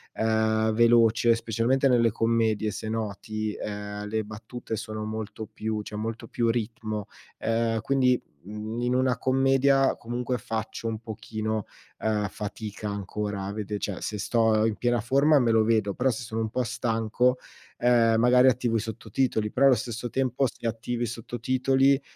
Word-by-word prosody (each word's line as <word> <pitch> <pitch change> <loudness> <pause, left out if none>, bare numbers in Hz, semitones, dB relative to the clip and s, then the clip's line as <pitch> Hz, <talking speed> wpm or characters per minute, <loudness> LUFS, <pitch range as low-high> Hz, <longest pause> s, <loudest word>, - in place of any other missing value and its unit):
uhm, 110 0 +2
veloce, 115 0 +5
specialmente 115 +4 +1
nelle 120 -3 +4
commedie, 115 -1 +1
se 110 +2 -5
noti, 110 0 -3
uhm, 105 0 -5
le 110 +1 -1
battute 110 +2 -6
sono 110 0 -5
molto 110 0 -5
più 110 0 -4
c'è 105 - -8
molto 110 +2 -4
più 120 -1 0
ritmo, 110 -2 -2 0.3
uhm, 115 0 0
quindi, 130 0 +2 0.3
mhmm, 105 +3 -5
in 125 +1 +1
una 130 0 +2
commedia, 135 +1 +3
comunque, 125 +2 -3
faccio 115 -1 -4
un 110 -1 -3
pochino, 110 -1 -4 0.3
uhm, 105 -1 0
fatica 105 +1 -6
ancora 100 0 -4
vede 105 -1 -3
cioè, 100 -3 -4
se 105 - -3
sto 110 +1 +2
in 110 -2 0
piena 120 +1 +1
forma, 140 +6 +4
me 120 -3 +2
lo 110 -1 +4
vedo, 110 -3 +1
però 130 +5 +1
se 120 0 -3
sono 110 0 -3
un 110 - -1
po' 125 +3 -1
stanco, 115 +2 0 0.4
uhm, 120 -2 +4
magari 125 +2 +6
attivo 120 -2 0
i - - +3
sottotitoli, 110 0 -1
però 135 +5 +4
allo 130 - +6
stesso 120 0 -4
tempo 135 +1 0
se 115 - -6
attivi 115 +1 -3
i - - +1
sottotitoli, 130 +4 +1
115 Hz, 160 wpm, -26 LUFS, 110-120 Hz, 0.4 s, magari